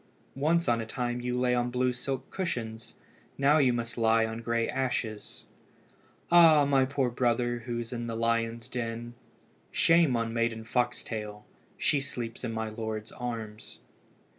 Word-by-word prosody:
once 165 Hz, +3 st, +2 dB
on 115 Hz, -1 st, +2 dB
a -, -, -4 dB
time 120 Hz, +1 st, -2 dB
you 125 Hz, 0 st, -1 dB
lay 125 Hz, 0 st, +2 dB
on 120 Hz, 0 st, +1 dB
blue 125 Hz, 0 st, +1 dB
silk 130 Hz, +1 st, -4 dB
cushions. 115 Hz, -, -4 dB, 0.4 s
Now 145 Hz, +3 st, +4 dB
you 130 Hz, -4 st, +4 dB
must 120 Hz, 0 st, -3 dB
lie 115 Hz, 0 st, +4 dB
on 110 Hz, +1 st, -5 dB
grey 115 Hz, 0 st, 0 dB
ashes. 120 Hz, -5 st, -3 dB, 0.9 s
Ah! 165 Hz, -4 st, +7 dB
my 135 Hz, -2 st, +3 dB
poor 135 Hz, -2 st, 0 dB
brother, 120 Hz, 0 st, +1 dB
who 120 Hz, -1 st, -2 dB
is 120 Hz, +1 st, -5 dB
in 120 Hz, -1 st, -4 dB
the 115 Hz, -, -3 dB
lions' 115 Hz, 0 st, 0 dB
den. 120 Hz, 0 st, -4 dB, 0.6 s
Shame 165 Hz, -6 st, +4 dB
on 115 Hz, -1 st, -1 dB
Maiden 115 Hz, -1 st, 0 dB
Foxtail! 110 Hz, -3 st, -2 dB, 0.3 s
she 145 Hz, -, +2 dB
sleeps 120 Hz, -5 st, -6 dB
in 120 Hz, -, -2 dB
my 110 Hz, 0 st, -3 dB
lord's 110 Hz, -1 st, -5 dB
arms." 110 Hz, -3 st, -6 dB
120 Hz, 155 wpm, -29 LUFS, 115-130 Hz, 0.9 s, Ah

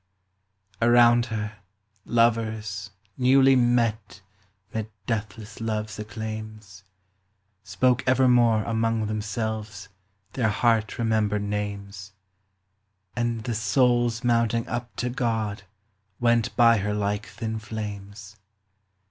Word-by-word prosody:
Around 120 Hz, 0 st, +5 dB
her, 105 Hz, -2 st, -4 dB, 0.5 s
lovers, 110 Hz, -3 st, 0 dB, 0.3 s
newly 135 Hz, +1 st, +5 dB
met 115 Hz, -5 st, +1 dB, 0.5 s
'Mid 110 Hz, -1 st, -3 dB, 0.2 s
deathless 110 Hz, 0 st, -5 dB
love's 110 Hz, -1 st, -3 dB
acclaims, 110 Hz, -2 st, -7 dB, 0.8 s
Spoke 120 Hz, +5 st, +1 dB
evermore 125 Hz, -4 st, +4 dB
among 115 Hz, 0 st, 0 dB
themselves 105 Hz, -1 st, -4 dB, 0.4 s
Their 115 Hz, -4 st, +1 dB
heart 110 Hz, 0 st, +1 dB
remembered 110 Hz, -3 st, 0 dB
names; 100 Hz, -2 st, -5 dB, 1.0 s
And 120 Hz, -2 st, -1 dB
the 120 Hz, -, -2 dB
souls 120 Hz, +2 st, +2 dB
mounting 115 Hz, -1 st, +1 dB
up 120 Hz, +1 st, -5 dB
to 125 Hz, 0 st, -2 dB
God 110 Hz, -5 st, -2 dB, 0.5 s
Went 120 Hz, -1 st, +2 dB
by 115 Hz, -1 st, +6 dB
her 105 Hz, +1 st, -2 dB
like 105 Hz, 0 st, -2 dB
thin 110 Hz, -1 st, -5 dB
flames. 105 Hz, -1 st, -7 dB
110 Hz, 95 wpm, -25 LUFS, 105-120 Hz, 1.0 s, by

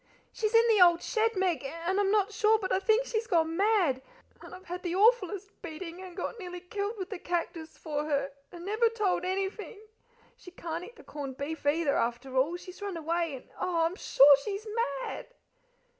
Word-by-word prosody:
"She's 435 Hz, +1 st, -1 dB
in 460 Hz, +1 st, +6 dB
the 435 Hz, -4 st, +4 dB
old 345 Hz, -1 st, +6 dB
shed, 450 Hz, 0 st, +1 dB
Meg, 360 Hz, -7 st, 0 dB
and 335 Hz, +7 st, -2 dB
I'm 400 Hz, -1 st, +2 dB
not 420 Hz, 0 st, +2 dB
sure, 435 Hz, +1 st, +4 dB
but 390 Hz, -3 st, -4 dB
I -, -, +3 dB
think 440 Hz, +5 st, +2 dB
she's 450 Hz, -2 st, -2 dB
gone 330 Hz, -6 st, +2 dB
mad; 380 Hz, -9 st, +2 dB, 0.4 s
and -, -, -10 dB
I've 370 Hz, +1 st, -14 dB
had 355 Hz, +1 st, -5 dB
the 350 Hz, -1 st, -2 dB
awfullest 405 Hz, -2 st, +3 dB
beating, 335 Hz, +2 st, -7 dB
and 370 Hz, -1 st, -10 dB
got 450 Hz, +5 st, -4 dB
nearly 360 Hz, -2 st, -6 dB
killed 405 Hz, +4 st, -4 dB
with 375 Hz, -2 st, -6 dB
the -, -, -5 dB
cactus 335 Hz, -2 st, -4 dB
for 300 Hz, -1 st, -3 dB
her, 280 Hz, -2 st, -1 dB, 0.2 s
and 345 Hz, 0 st, -10 dB
never 435 Hz, +3 st, +2 dB
told 420 Hz, -6 st, 0 dB
anything. 390 Hz, +3 st, -3 dB, 0.6 s
She -, -, -13 dB
can't 340 Hz, -1 st, -5 dB
eat 470 Hz, +6 st, -11 dB
the -, -, -15 dB
corned 275 Hz, -3 st, -7 dB
beef, 290 Hz, +1 st, -4 dB
either, 295 Hz, -1 st, +2 dB
after 240 Hz, +3 st, -2 dB
all. 295 Hz, +7 st, +2 dB
She's 365 Hz, +2 st, -12 dB
run 400 Hz, -4 st, -4 dB
away 330 Hz, -1 st, -1 dB
and 255 Hz, -, -12 dB
oh, 345 Hz, -3 st, +1 dB
I'm 335 Hz, +3 st, -1 dB
sure 285 Hz, -7 st, +7 dB
she's 410 Hz, +4 st, -4 dB, 0.4 s
mad!" -, -, -6 dB
360 Hz, 200 wpm, -29 LUFS, 330-410 Hz, 0.6 s, sure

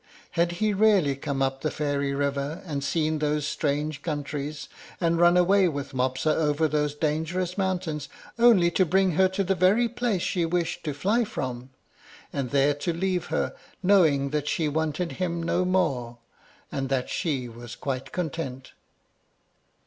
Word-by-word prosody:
Had 170 Hz, +1 st, +1 dB
he 210 Hz, +4 st, 0 dB
really 195 Hz, -9 st, +4 dB
come 140 Hz, -1 st, -2 dB
up 135 Hz, 0 st, -1 dB
the 155 Hz, -, 0 dB
fairy 145 Hz, -2 st, -1 dB
river, 140 Hz, +2 st, -2 dB
and 145 Hz, -5 st, -3 dB
seen 155 Hz, +1 st, 0 dB
those 150 Hz, -1 st, 0 dB
strange 150 Hz, 0 st, -1 dB
countries, 145 Hz, -1 st, -4 dB, 0.3 s
and 170 Hz, -1 st, +1 dB
run 175 Hz, +1 st, +6 dB
away 190 Hz, +2 st, +4 dB
with 145 Hz, -5 st, -4 dB
Mopsa 130 Hz, +4 st, +1 dB
over 155 Hz, 0 st, +2 dB
those 150 Hz, -1 st, 0 dB
dangerous 160 Hz, +4 st, -1 dB
mountains, 180 Hz, -7 st, -2 dB, 0.3 s
only 215 Hz, -8 st, +6 dB
to 185 Hz, -, +3 dB
bring 190 Hz, +2 st, +2 dB
her 190 Hz, +3 st, +4 dB
to 190 Hz, +1 st, -1 dB
the 195 Hz, +1 st, +1 dB
very 190 Hz, +6 st, +3 dB
place 235 Hz, -6 st, -1 dB
she 175 Hz, -, 0 dB
wished 170 Hz, 0 st, -1 dB
to 150 Hz, -3 st, -2 dB
fly 210 Hz, +10 st, +2 dB
from, 130 Hz, -, -5 dB, 0.6 s
and 135 Hz, -3 st, -2 dB
there 140 Hz, +2 st, +3 dB
to 145 Hz, +5 st, -2 dB
leave 180 Hz, 0 st, -1 dB
her, -, -, -1 dB, 0.3 s
knowing 160 Hz, -8 st, +4 dB
that 150 Hz, -1 st, -1 dB
she 160 Hz, +1 st, 0 dB
wanted 160 Hz, +3 st, -1 dB
him 170 Hz, -2 st, -2 dB
no 175 Hz, +2 st, +1 dB
more, 135 Hz, -11 st, 0 dB, 0.5 s
and 135 Hz, -1 st, -3 dB
that 130 Hz, -2 st, 0 dB
she 140 Hz, -8 st, -2 dB
was 120 Hz, 0 st, -9 dB
quite 135 Hz, -1 st, -4 dB
content? 145 Hz, -6 st, -4 dB
155 Hz, 160 wpm, -26 LUFS, 140-180 Hz, 0.6 s, run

